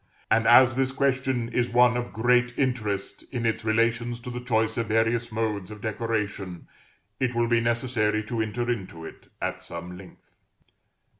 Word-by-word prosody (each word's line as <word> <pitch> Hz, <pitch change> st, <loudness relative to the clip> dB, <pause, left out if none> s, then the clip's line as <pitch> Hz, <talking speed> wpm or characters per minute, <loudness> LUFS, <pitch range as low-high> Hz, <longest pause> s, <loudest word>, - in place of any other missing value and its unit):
And 115 Hz, +1 st, +3 dB
as 120 Hz, +1 st, +7 dB
this 135 Hz, 0 st, +1 dB
question 130 Hz, -3 st, 0 dB
is 120 Hz, 0 st, 0 dB
one 125 Hz, 0 st, +4 dB
of 120 Hz, 0 st, -3 dB
great 125 Hz, +2 st, +2 dB
interest 105 Hz, -7 st, -2 dB
in 120 Hz, -3 st, -2 dB
its 110 Hz, 0 st, 0 dB
relations 115 Hz, +2 st, +1 dB
to 125 Hz, -, -7 dB
the 125 Hz, -, -4 dB
choice 115 Hz, -3 st, +1 dB
of 115 Hz, -, -1 dB
various 115 Hz, +2 st, +1 dB
modes 110 Hz, -3 st, -2 dB
of 105 Hz, 0 st, -9 dB
decoration, 105 Hz, -5 st, -3 dB, 0.5 s
it 125 Hz, -2 st, 0 dB
will 120 Hz, 0 st, +2 dB
be 115 Hz, -1 st, +3 dB
necessary 115 Hz, -2 st, 0 dB
to 115 Hz, +1 st, -2 dB
enter 110 Hz, +2 st, -2 dB
into 95 Hz, -9 st, -4 dB
it -, -, -12 dB, 0.2 s
at -, -, -2 dB
some 85 Hz, +1 st, -7 dB
length. 90 Hz, -1 st, -15 dB
115 Hz, 165 wpm, -26 LUFS, 110-120 Hz, 0.5 s, as